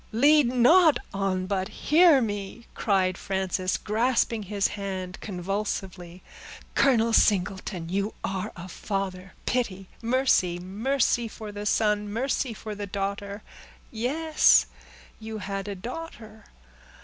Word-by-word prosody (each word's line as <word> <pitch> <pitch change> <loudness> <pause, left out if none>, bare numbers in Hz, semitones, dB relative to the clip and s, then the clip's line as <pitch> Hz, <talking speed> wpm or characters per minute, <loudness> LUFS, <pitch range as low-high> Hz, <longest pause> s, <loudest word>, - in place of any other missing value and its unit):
"Lead 285 +4 +5
not 290 +7 +5 0.2
on, 195 -2 -1
but 190 -1 -1
hear 315 -2 +4
me," 205 +2 -5
cried 190 -3 +1
Frances, 190 -1 -1
grasping 230 +1 0
his 200 0 -1
hand 190 -3 -5
convulsively. 190 -2 -4 0.5
"Colonel 230 -4 +3
Singleton, 190 -4 +1
you 200 +4 -2
are 190 +2 -3
a 175 +1 -8
father!—pity—mercy—mercy 195 +4 -1
for 215 -1 -8
the 205 0 -5
son! 210 -1 +1
mercy 250 +2 -1
for 215 0 -7
the 205 0 -6
daughter! 200 +1 -4 0.5
Yes—you 245 -4 0
had 195 -1 -5
a 200 - -4
daughter. 220 - -8
205 Hz, 100 wpm, -26 LUFS, 190-235 Hz, 0.5 s, Lead